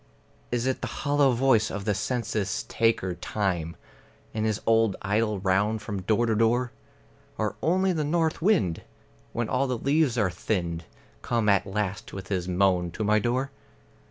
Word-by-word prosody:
Is 120 0 0
it 130 0 -1
the - - -2
hollow 145 -1 +2
voice 120 -3 +3
of 100 -1 -5
the 105 - +2
census 105 -2 -2
taker 115 -5 +1
Time 90 -4 -2 0.6
In 110 0 -1
his 110 -1 0
old 115 -3 +3
idle 105 +1 +1
round 105 +3 +1
from 105 -3 -4
door 110 +5 +2
to 115 - +1
door? 120 +3 +2 0.7
Or 110 -1 -1
only 185 +3 +2
the 155 -3 -1
north 160 +2 0
wind, 165 - +2 0.5
when 120 -1 -2
all 130 +4 +1
the 125 -1 -1
leaves 140 0 +2
are 100 -5 +2
thinned, 85 -5 -2 0.4
Come 115 -3 0
at 100 0 +3
last 105 +2 -3
with 95 -1 -7
his 90 -3 -1
moan 90 -1 +2
to 110 - -3
my 105 +1 +3
door? 125 +5 -1
110 Hz, 165 wpm, -27 LUFS, 100-125 Hz, 0.7 s, voice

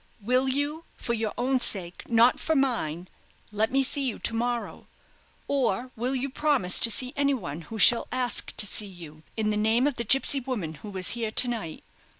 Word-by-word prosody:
Will 250 +5 +1
you, 290 +4 -2
for 235 - -3
your 220 -2 -2
own 255 +2 +1
sake, 180 -7 -1
not 235 +1 +4
for 320 - 0
mine, 185 - 0 0.4
let 215 +2 0
me 270 +1 +2
see 280 +1 0
you 255 -5 -2
to - - 0
morrow; 240 +1 -3 0.6
or 260 -2 -1
will 250 +4 -2
you 265 +1 -2
promise 275 -9 +1
to 230 - +3
see 250 +4 -1
anyone 250 - -1
who 225 - -6
shall 235 +2 +6
ask 250 -2 0
to 210 - +6
see 205 +1 -1
you, 165 -5 -12 0.2
in 215 -1 0
the 210 - -1
name 220 +4 +2
of 285 -3 -1
the 235 - -2
gipsy 270 +4 +3
woman 235 -12 -4
who 210 - -8
was 190 -2 -2
here 230 -2 -3
to 245 +3 +5
night? 220 -10 -5
235 Hz, 195 wpm, -26 LUFS, 210-265 Hz, 0.6 s, shall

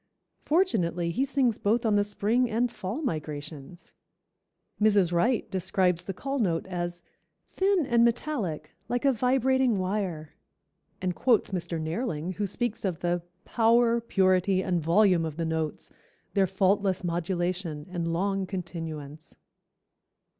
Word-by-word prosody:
Fortunately 180 - +1
he 255 - 0
sings 270 -5 +1
both 230 +4 +1
on 215 -2 +3
the 205 - +4
spring 215 +4 0
and 235 +2 0
fall 210 +10 -5
migrations." 150 - -6 0.9
Mrs. 200 -5 +4
Wright 230 +8 +2
describes 185 -2 +1
the 195 - -4
call 275 +5 -3
note 170 -7 0
as 175 -2 -4 0.5
"Thin 380 -4 +2
and 235 -2 +3
metallic, 230 - -1 0.2
like 245 +2 -1
a 275 - +5
vibrating 255 -1 +2
wire," 185 -5 -3 0.7
and 180 -1 0
quotes 235 +2 +2
Mr. 175 -3 -3
Nehrling, 165 0 -3
who 205 -1 -1
speaks 235 +3 -2
of 185 -5 -2
the 175 0 0 0.2
"Power, 235 +1 +3
purity 190 -3 +2
and 180 -3 0
volume 175 +1 +4
of 160 -2 -4
the 165 - -1
notes, 160 -1 -3 0.4
their 195 -2 +3
faultless 190 0 +1
modulation 175 -2 -2
and 170 -2 -2
long 195 +2 -1
continuance." 165 -5 -6
190 Hz, 130 wpm, -27 LUFS, 170-230 Hz, 0.9 s, a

